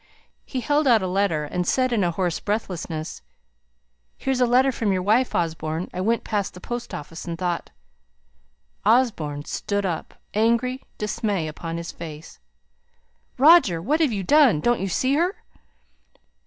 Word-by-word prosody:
He 255 - -4
held 290 +4 +1
out 230 -5 +5
a - - -1
letter, 180 -5 +1
and 180 +3 -3
said 255 -1 +2
in 220 - +2
hoarse 175 -1 0
breathlessness 180 -6 -4 1.0
"Here's 265 -1 -1
a 250 - +4
letter 255 +3 +4
from 225 -4 -1
your 185 -1 0
wife, 225 +6 +2
Osborne. 160 0 -2
I 185 - -3
went 230 +4 +1
past 205 -4 -2
the - - -9
post 240 +5 -5
office 160 +3 -7
and 170 -1 -4
thought 175 -1 -2 0.6
" 70 +1 -42 0.2
Osborne 150 - -3
stood 200 -1 -2
up, 170 -4 -4 0.2
angry 235 +4 +1 0.2
dismay 205 -5 -1
upon 165 +2 -5
his 170 0 -5
face: 160 -1 -10 1.0
"Roger! 280 - +6
what 290 - 0
have 310 -6 +3
you 200 -3 -2
done! 270 - +5
Don't 240 +8 +1
you 195 - -2
see 255 +8 +1
her?" 350 +7 +1
200 Hz, 155 wpm, -24 LUFS, 165-245 Hz, 1.0 s, Roger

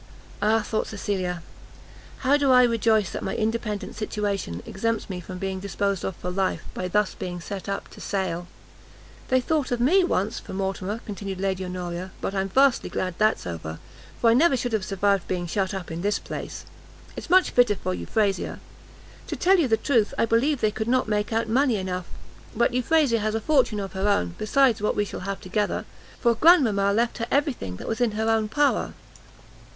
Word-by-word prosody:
Ah, 215 +1 +3
thought 215 +1 -2
Cecilia, 185 -4 -3 0.8
how 275 +2 +5
do 285 -2 +2
I 250 0 +7
rejoice 225 -4 +2
that - - -4
my - - -3
independent 220 -1 -2
situation 200 - -3
exempts 225 +1 -2
me 180 - -4
from 180 +1 -8
being 190 0 -3
disposed 200 0 -2
of 190 - -3
for 180 - -5
life, 190 +1 -1
by 185 - -3
thus 210 +2 +1
being 175 -1 -5
set 195 +3 -6
up 195 - -3
to - - -13
sale! 180 -3 -2 0.8
"They 255 - +3
thought 290 +2 0
of 245 - 0
me, 345 +11 +4
once, 210 - 0
for - - -10
Mortimer," 195 +3 -3
continued 195 -2 -5
Lady 190 -1 -1
Honoria, 180 0 -5
"but - - -3
I'm 195 0 -1
vastly 270 +4 +3
glad 185 -1 -2
that's 215 0 +2
over, 80 -2 -5 0.4
for 230 - +5
I - - +5
never 275 +2 +4
should 245 -1 -3
have 215 -3 +1
survived 195 -1 +1
being 180 -1 -2
shut 190 +2 -1
up 190 -4 -5
in 165 +1 -4
this 205 +1 +1
place; - - -7 0.5
it's - - -7
much 370 +1 +5
fitter 245 -4 +4
for 90 - -3
Euphrasia. 195 - -1 0.7
To - - -3
tell 380 +1 +4
you 310 - +3
the 225 -2 +3
truth, 230 -6 +1
I - - +3
believe 240 +5 +2
they 215 - +3
could 220 +1 -3
not 255 0 +2
make 210 0 0
out 225 0 0
money 250 +2 +2
enough; 185 -2 -3 0.5
but 235 +2 +2
Euphrasia 255 -1 +3
has 215 +1 -1
a - - +1
fortune 255 -5 +2
of 195 -1 -5
her 195 +2 0
own, 90 - +1
besides 240 0 +3
what 210 - +1
we 205 - +1
shall - - -6
have 195 - -3
together, 205 +3 -1 0.3
for 235 -1 +3
Grandmama 230 - +5
left 235 +3 0
her 230 - -2
every 285 +1 +2
thing 90 - -7
that - - -8
was 225 +2 -2
in 235 -3 +2
her 220 +1 -1
own 220 -1 +2
power." 290 +4 +1
210 Hz, 200 wpm, -25 LUFS, 190-235 Hz, 0.8 s, I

